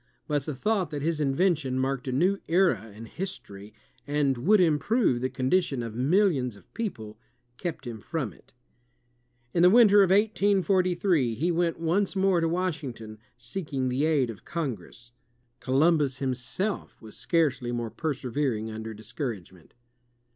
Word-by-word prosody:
But 145 Hz, -2 st, -1 dB
the 150 Hz, -, -3 dB
thought 195 Hz, -, 0 dB
that 145 Hz, -2 st, -5 dB
his 160 Hz, -1 st, 0 dB
invention 145 Hz, -2 st, +1 dB
marked 135 Hz, 0 st, -1 dB
a -, -, -1 dB
new 180 Hz, +9 st, +2 dB
era 175 Hz, -, +2 dB
in 110 Hz, +3 st, -10 dB
history, 110 Hz, -, -7 dB, 0.4 s
and 145 Hz, -2 st, +1 dB
would 195 Hz, -, +3 dB
improve 165 Hz, -, +2 dB
the 130 Hz, -, 0 dB
condition 135 Hz, -1 st, 0 dB
of 115 Hz, -2 st, -6 dB
millions 135 Hz, -, +2 dB
of 95 Hz, -, -22 dB
pe(q)le, 110 Hz, -, -5 dB, 0.4 s
kept 165 Hz, -6 st, -5 dB
him 115 Hz, -2 st, -6 dB
from 135 Hz, -, -4 dB
it. -, -, -23 dB, 1.0 s
In 170 Hz, -, +2 dB
the 180 Hz, -, +7 dB
winter 210 Hz, -1 st, +7 dB
of 195 Hz, -, +4 dB
1843, 190 Hz, -, +2 dB
^^ 170 Hz, +4 st, +1 dB
went 170 Hz, -1 st, 0 dB
once 185 Hz, +5 st, 0 dB
more 190 Hz, -2 st, +2 dB
to 165 Hz, -, +1 dB
Washington, 145 Hz, -12 st, -4 dB, 0.2 s
seeking 130 Hz, 0 st, -4 dB
the 130 Hz, +4 st, 0 dB
aid 140 Hz, -7 st, +2 dB
of 105 Hz, -, -13 dB
Congress. 120 Hz, -, -6 dB, 0.5 s
Co 130 Hz, -, -4 dB
lumbus 145 Hz, -2 st, +3 dB
himself 135 Hz, -, -3 dB
was 110 Hz, -1 st, -12 dB
scarcely 145 Hz, -8 st, 0 dB
more 120 Hz, -2 st, -3 dB
persevering 125 Hz, -4 st, -2 dB
under 110 Hz, 0 st, -6 dB
discouragement. 110 Hz, -, -7 dB
145 Hz, 145 wpm, -27 LUFS, 120-180 Hz, 1.0 s, the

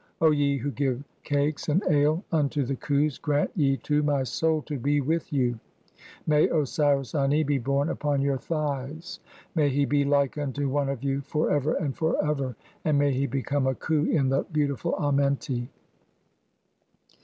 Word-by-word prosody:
O 160 Hz, -1 st, +5 dB
ye 145 Hz, -1 st, +2 dB
who 140 Hz, +3 st, -3 dB
give 135 Hz, -2 st, -1 dB, 0.2 s
cakes 145 Hz, +1 st, -1 dB
and 175 Hz, +7 st, +2 dB
ale 150 Hz, +4 st, +3 dB
unto 145 Hz, -3 st, +1 dB
the 135 Hz, -, -2 dB
Khus, 145 Hz, +2 st, 0 dB
grant 150 Hz, -2 st, +1 dB
"ye 135 Hz, -4 st, +2 dB
to 150 Hz, 0 st, +1 dB
my 145 Hz, -2 st, +1 dB
soul 155 Hz, +3 st, 0 dB
to 145 Hz, -3 st, -5 dB
be 145 Hz, +4 st, +1 dB
with 160 Hz, +4 st, -1 dB
you. 125 Hz, -5 st, 0 dB, 0.7 s
May 150 Hz, -1 st, +4 dB
Osiris 145 Hz, -3 st, +1 dB
Ani 145 Hz, +1 st, +2 dB
be 145 Hz, -1 st, 0 dB
born 140 Hz, +4 st, 0 dB
upon 145 Hz, -3 st, -1 dB
your 140 Hz, -1 st, 0 dB
"thighs; 150 Hz, +2 st, -4 dB, 0.3 s
may 150 Hz, -4 st, +2 dB
he 140 Hz, +1 st, +1 dB
be 145 Hz, 0 st, +2 dB
like 140 Hz, 0 st, +1 dB
unto 145 Hz, 0 st, -2 dB
one 140 Hz, 0 st, 0 dB
of 135 Hz, -2 st, -4 dB
you 140 Hz, 0 st, 0 dB
for 150 Hz, +3 st, -1 dB
ever 145 Hz, +1 st, +1 dB
and 140 Hz, -4 st, -2 dB
for 160 Hz, -1 st, 0 dB
ever; 135 Hz, -5 st, -1 dB, 0.3 s
and 150 Hz, -2 st, +2 dB
"may 145 Hz, 0 st, +3 dB
he 135 Hz, +2 st, 0 dB
become 135 Hz, 0 st, -1 dB
a 130 Hz, -, +1 dB
Khu 155 Hz, +2 st, 0 dB
in 140 Hz, -6 st, +2 dB
the 135 Hz, +1 st, +2 dB
beautiful 150 Hz, +1 st, 0 dB
Amenti." 140 Hz, -4 st, 0 dB
145 Hz, 175 wpm, -26 LUFS, 135-150 Hz, 0.7 s, O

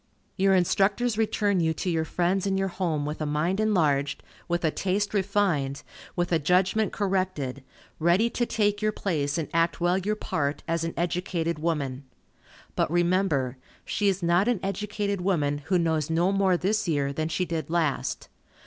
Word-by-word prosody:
Your 195 Hz, 0 st, +3 dB
instructors 200 Hz, +6 st, +2 dB
return 210 Hz, -3 st, +1 dB
you 160 Hz, -1 st, +1 dB
to -, -, -4 dB
your 165 Hz, -2 st, +1 dB
friends 180 Hz, +4 st, 0 dB
and 195 Hz, 0 st, +1 dB
your 195 Hz, 0 st, 0 dB
home 170 Hz, -5 st, -1 dB
with 150 Hz, +1 st, -4 dB
a -, -, 0 dB
mind 160 Hz, +7 st, 0 dB
enlarged, 150 Hz, -10 st, +1 dB, 0.2 s
with 175 Hz, 0 st, 0 dB
a 160 Hz, -, +2 dB
taste 200 Hz, +4 st, -1 dB
refined, 190 Hz, -9 st, 0 dB, 0.3 s
with 175 Hz, 0 st, -1 dB
a 165 Hz, -, +3 dB
judgment 185 Hz, +7 st, +2 dB
corrected, 185 Hz, -10 st, -2 dB, 0.4 s
ready 175 Hz, +7 st, +3 dB
to 240 Hz, 0 st, -1 dB
take 205 Hz, -1 st, +1 dB
your 215 Hz, 0 st, +2 dB
place 150 Hz, -8 st, -1 dB
and 160 Hz, -, -2 dB
act 165 Hz, 0 st, +1 dB
well 175 Hz, +2 st, +2 dB
your 210 Hz, +3 st, -1 dB
part, 145 Hz, -8 st, -2 dB
as 165 Hz, 0 st, 0 dB
an 165 Hz, -, -3 dB
educated 170 Hz, -1 st, -1 dB
woman. 145 Hz, -5 st, -2 dB, 0.7 s
But -, -, +1 dB
remember, 170 Hz, -7 st, +1 dB, 0.3 s
she 205 Hz, -, 0 dB
is 195 Hz, -2 st, +1 dB
not 175 Hz, +4 st, +3 dB
an 245 Hz, -5 st, +2 dB
educated 200 Hz, 0 st, -2 dB
woman, 150 Hz, -6 st, +1 dB
who 180 Hz, +3 st, +2 dB
knows 160 Hz, -3 st, 0 dB
no 170 Hz, +3 st, +2 dB
more 195 Hz, -2 st, +3 dB
this 210 Hz, +3 st, 0 dB
year 140 Hz, -4 st, 0 dB
than 155 Hz, +2 st, -2 dB
she 180 Hz, +3 st, 0 dB
did 165 Hz, -2 st, -3 dB
last. 165 Hz, -4 st, -1 dB
175 Hz, 175 wpm, -26 LUFS, 160-195 Hz, 0.7 s, Your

